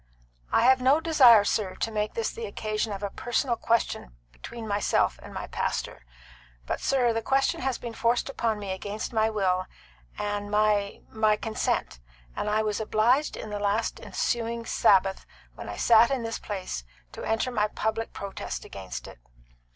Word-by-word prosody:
"I - - +4
have 260 +1 +5
no 270 +4 +5
desire, 265 -10 +7
sir, 200 -2 -1
to 225 - -2
make 210 -1 -2
this 460 - -1
the 455 0 -6
occasion 215 0 -2
of 200 0 -5
a 200 - -2
personal 240 +2 -1
question 225 - -1 0.2
between 220 - -8
myself 205 0 +1
and - - -11
my - - -5
pastor. - - -3 0.6
But, - - -3
sir, 250 -4 +2
the 225 - -1
question 270 +4 +1
has 260 -1 -1
been 235 -2 -7
forced 235 +1 +1
upon 230 -5 -1
me 200 -2 -5
against 205 +5 -5
my 220 0 +3
will 185 -4 0 0.5
and 205 0 -3
my 210 -1 +1
my 215 -1 +3
consent; 215 - -2 0.4
and 210 - -2
I 215 +1 +2
was 210 0 -1
obliged 230 +7 +2
on 215 - -7
the 205 - -3
last 205 +2 0
ensuing 235 -1 -2
Sabbath, 195 -3 +3 0.3
when - - -8
I - - -6
sat 230 0 +6
in 265 -3 -1
this 225 0 -3
place, 185 - -5 0.3
to - - -8
enter 225 +3 0
my 215 -3 +1
public 220 +1 -2
protest 190 - -6
against - - -7
it. - - -12
220 Hz, 175 wpm, -27 LUFS, 205-235 Hz, 0.6 s, desire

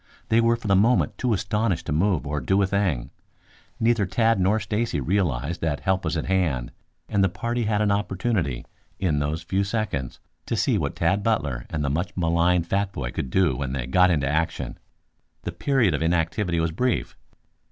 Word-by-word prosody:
They 115 +1 +4
were 115 0 +3
for 115 -2 -7
the 100 - +4
moment 115 +6 +2
too 125 - 0
astonished 105 -3 0
to - - -3
move 85 +2 +1
or 75 0 -2
do 95 +11 +2
a - - +3
thing. 95 -11 -1 0.7
Neither 115 -3 +2
Tad 115 +3 +2
nor 95 +4 +3
Stacy 105 -3 -1
realized 80 -2 -1
that 80 -3 -1
help 95 0 0
was 80 +1 -1
at 75 - -2
hand, 80 -10 0 0.4
and 100 -1 +1
the 95 - +3
party 120 +5 -2
had 105 0 +1
an 105 - +2
opportunity, 95 - -1 0.3
in 80 -6 0
those 75 +4 -2
few 95 +4 0
seconds, 95 - -3 0.3
to - - -1
see - - +2
what - - -2
Tad 95 +5 +1
Butler 75 - -1
and 75 -3 -2
the - - 0
much 90 +6 -2
maligned 85 0 +2
fat 100 +3 0
boy 60 -9 -4
could 65 0 -4
do 90 -3 +2
when 65 0 -3
they 65 -3 -2
got 90 +8 +4
into 75 -6 +1
action. 80 +4 -2 0.6
The - - -3
period 130 - +1
of 75 - -1
inactivity 85 +2 0
was 80 0 0
brief. 125 +8 -1
90 Hz, 195 wpm, -24 LUFS, 75-105 Hz, 0.7 s, They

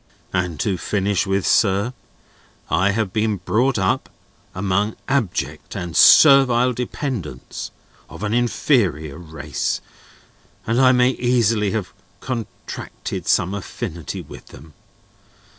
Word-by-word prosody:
"And 90 -4 -1
to 95 -4 -1
finish 100 +2 0
with, 95 0 0
sir: 100 +3 +2 0.8
I 95 +4 +3
have 100 -2 -1
been 110 -1 0
brought 120 +8 +1
up 95 -2 0 0.5
among 100 +3 0
abject 135 -9 -2
and 85 -1 -5
servile 130 -4 +7
dependents, 120 - -5 0.4
of - - -9
an 105 +1 -1
inferior 100 - +1
race, 80 -4 -3 0.9
and 115 +3 +1
I 130 -1 +6
may 125 0 +4
easily 115 -5 +1
have 105 -5 -3 0.3
contracted 120 -4 -6
some 90 +3 +2
affinity 90 - -6
with - - -13
them. 75 +1 -14
105 Hz, 110 wpm, -21 LUFS, 90-120 Hz, 0.9 s, servile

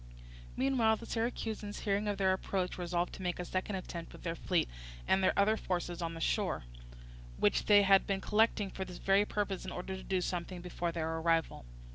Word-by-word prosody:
Meanwhile 250 -4 +3
the 230 - -9
Syracusans 225 -3 -3
hearing 205 +1 0
of 205 -1 -1
their 190 -1 +3
approach 185 -1 -2
resolved 175 0 -1
to - - -8
make 180 -1 -1
a 180 - -4
second 185 +3 -2
attempt 170 -2 -6
with - - -12
their 165 - -1
fleet 175 0 0 0.4
and 190 - +3
their - - +3
other 205 +2 +4
forces 175 -4 -3
on 165 -1 -3
shore, 165 - 0 0.7
which - - +2
they 205 -1 +7
had 195 0 +5
been 195 -1 0
collecting 210 -1 +2
for 190 - -4
this 180 -2 -8
very 195 +1 +3
purpose 205 -3 -2
in 190 - -5
order 185 +2 -4
to 190 - -7
do 190 -1 0
something 180 0 -3
before 175 -1 -3
their 160 -1 -2
arrival. 165 - +1
190 Hz, 195 wpm, -33 LUFS, 175-205 Hz, 0.7 s, they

